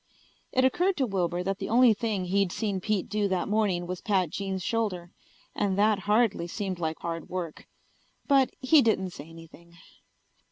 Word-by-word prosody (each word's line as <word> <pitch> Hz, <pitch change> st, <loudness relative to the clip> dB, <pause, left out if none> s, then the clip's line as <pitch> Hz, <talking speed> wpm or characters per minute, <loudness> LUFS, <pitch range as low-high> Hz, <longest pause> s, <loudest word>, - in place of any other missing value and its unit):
It 260 Hz, -1 st, +3 dB
occurred 360 Hz, +7 st, +1 dB
to 270 Hz, -, +2 dB
Wilbur 180 Hz, -4 st, -1 dB
that 195 Hz, +2 st, -2 dB
the 195 Hz, -, -4 dB
only 240 Hz, +1 st, +6 dB
thing 210 Hz, -3 st, -2 dB
he'd 195 Hz, 0 st, +1 dB
seen 200 Hz, -3 st, -2 dB
Pete 210 Hz, -1 st, -1 dB
do 210 Hz, 0 st, 0 dB
that 185 Hz, -2 st, -1 dB
morning 205 Hz, -5 st, 0 dB
was 180 Hz, 0 st, -5 dB
pat 190 Hz, -6 st, +1 dB
Jean's 190 Hz, -2 st, -3 dB
shoulder, 210 Hz, -8 st, -2 dB, 0.4 s
and 195 Hz, -2 st, -1 dB
that 210 Hz, 0 st, +3 dB
hardly 210 Hz, -5 st, +2 dB
seemed 185 Hz, 0 st, -4 dB
like 160 Hz, -1 st, -2 dB
hard 165 Hz, -1 st, -5 dB
work. 175 Hz, -4 st, -5 dB, 0.6 s
But 275 Hz, -2 st, +4 dB
he 280 Hz, +3 st, +5 dB
didn't 190 Hz, -6 st, +1 dB
say 155 Hz, -2 st, -10 dB
anything. 165 Hz, +1 st, -15 dB
195 Hz, 170 wpm, -27 LUFS, 175-220 Hz, 0.6 s, only